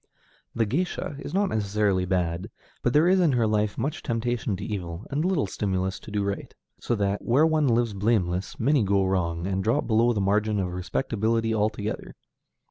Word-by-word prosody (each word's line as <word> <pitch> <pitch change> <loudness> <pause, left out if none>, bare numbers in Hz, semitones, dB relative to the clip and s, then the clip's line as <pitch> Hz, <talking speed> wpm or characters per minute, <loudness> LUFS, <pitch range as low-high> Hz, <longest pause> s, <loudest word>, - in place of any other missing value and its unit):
The 115 - +2
géisha 150 - -2
is - - -6
not 195 +1 +1
necessarily 100 -3 +1
bad, 90 -1 -1 0.3
but 120 - +1
there 150 +6 +4
is 190 +1 +4
in 165 -6 +3
her 120 -2 +2
life 105 -1 0
much 150 +4 -2
temptation 120 -2 -1
to 100 - -6
evil, 90 -2 -5
and 145 +3 0
little 180 - +1
stimulus 95 -1 -2
to - - -11
do 105 -1 -1
right, 100 0 -4 0.2
so 120 - -1
that, 100 -1 0
where 135 +6 +3
one 155 -2 +2
lives 120 -2 +2
blameless, 95 -3 0
many 140 +3 +3
go 100 -1 +2
wrong, 85 -3 -1
and 95 0 -1
drop 115 +8 +1
below 115 +1 +3
the 110 - -1
margin 105 +2 +1
of 90 -2 -2
respectability 115 +4 -1
altogether. 105 0 -2
105 Hz, 185 wpm, -26 LUFS, 95-120 Hz, 0.3 s, there